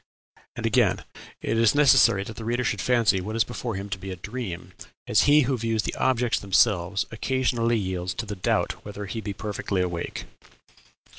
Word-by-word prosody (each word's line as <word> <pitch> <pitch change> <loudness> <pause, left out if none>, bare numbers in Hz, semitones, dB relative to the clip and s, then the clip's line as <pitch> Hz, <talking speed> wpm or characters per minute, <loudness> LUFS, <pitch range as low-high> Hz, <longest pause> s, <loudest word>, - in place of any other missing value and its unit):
And - - -4
again, - - +2 0.4
"It 115 - 0
is 115 +3 +4
necessary 115 -8 +5
that 110 +2 -8
the 115 - -7
reader 120 +2 -1
should 105 -5 -1
fancy 115 -6 +2
what 110 +4 -5
is 115 - +3
before 120 -1 -5
him 100 +1 -5
to 100 -1 -4
be 95 +1 -7
a 95 - -4
dream, 95 -3 -6 0.3
as - - +3
he 150 +1 +7
who 135 0 +1
views 115 -1 0
the - - -3
objects 125 -2 +1
themselves 95 -1 +2
occasionally 120 0 0
yields 95 -2 -3
to 120 - -4
the 105 -1 -5
doubt 90 - -1
whether 105 0 -7
he 110 +4 -5
be 100 -1 -4
perfectly 100 -1 -3
awake." 90 -2 -3
110 Hz, 190 wpm, -25 LUFS, 95-120 Hz, 0.4 s, he